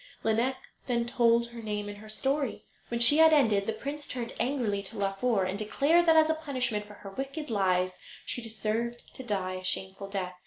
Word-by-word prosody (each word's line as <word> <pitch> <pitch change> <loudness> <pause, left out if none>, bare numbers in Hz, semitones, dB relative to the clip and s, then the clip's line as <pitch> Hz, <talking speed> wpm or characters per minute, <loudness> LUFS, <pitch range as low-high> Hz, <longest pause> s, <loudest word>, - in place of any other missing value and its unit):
Lineik 230 +4 +1 0.3
then 235 -2 +1
told 235 0 +3
her 235 -1 -9
name 210 -1 -3
and 205 0 -7
her 215 +1 -12
story. 270 +4 -1 0.2
When 235 - -2
she 240 +5 +8
had 320 0 +7
ended 220 -9 +3
the - - +1
prince 285 +6 -6
turned 245 -1 -4
angrily 240 -7 0
to 195 - -10
Laufer, 200 +2 +1
and 190 +2 -3
declared 300 +11 +2
that, 325 - +6
as 315 -1 +6
a 320 - +2
punishment 255 -9 -2
for 210 - -12
her 200 -1 -10
wicked 275 +5 -5
lies, 185 -3 +1 0.3
she 245 - -3
deserved 225 +2 -3
to - - -7
die 190 -6 -2
a 185 - -9
shameful 190 +1 -2
death. 190 -2 -3
230 Hz, 200 wpm, -29 LUFS, 200-265 Hz, 0.3 s, she